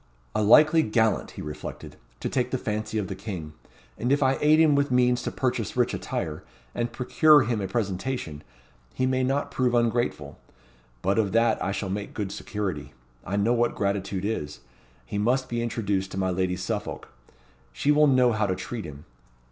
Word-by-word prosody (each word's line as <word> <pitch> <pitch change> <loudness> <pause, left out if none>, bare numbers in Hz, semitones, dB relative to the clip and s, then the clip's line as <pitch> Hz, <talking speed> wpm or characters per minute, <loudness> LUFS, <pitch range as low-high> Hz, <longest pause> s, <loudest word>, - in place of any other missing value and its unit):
"A - - 0
likely 155 +9 +6
gallant," 110 -3 +1
he - - -5
reflected, 75 0 -8 0.3
"to - - -2
take - - 0
the - - -1
fancy 110 +1 -3
of 105 -3 -1
the 95 - -4
king; 95 -6 -7 0.5
and 120 +3 0
if 145 0 +3
I 135 0 +2
aid 155 +1 +5
him 160 -2 +5
with 140 0 +2
means 125 -1 +3
to - - -3
purchase - - -2
rich - - +2
attire, 80 -2 -4 0.3
and 120 0 -2
procure 150 +4 +5
him 115 -2 -1
a 95 - -2
presentation, 95 - -3 0.5
he 130 - +1
may 130 0 +1
not 135 +3 -1
prove 125 -1 +1
ungrateful. 120 -11 0 0.6
But 100 +4 +2
of 105 -3 0
that 115 -1 +2
I 95 - -1
shall 95 -1 -3
take 105 0 -5
good 100 -3 -3
security. 85 -12 -4 0.3
I 95 - -3
know 105 +4 +2
what 120 0 +1
gratitude 100 -1 -2
is. 75 - -3 0.4
He 100 - -4
must 130 +5 +1
be 120 0 -2
introduced 100 -5 -1
to - - -5
my 95 -1 0
Lady 90 0 0
Suffolk. 90 - -4 0.6
She 140 - +1
will 150 0 +5
know 130 -3 +4
how 110 -2 0
to 95 - 0
treat 115 +2 -6
him. 75 0 -10
110 Hz, 190 wpm, -26 LUFS, 95-125 Hz, 0.6 s, likely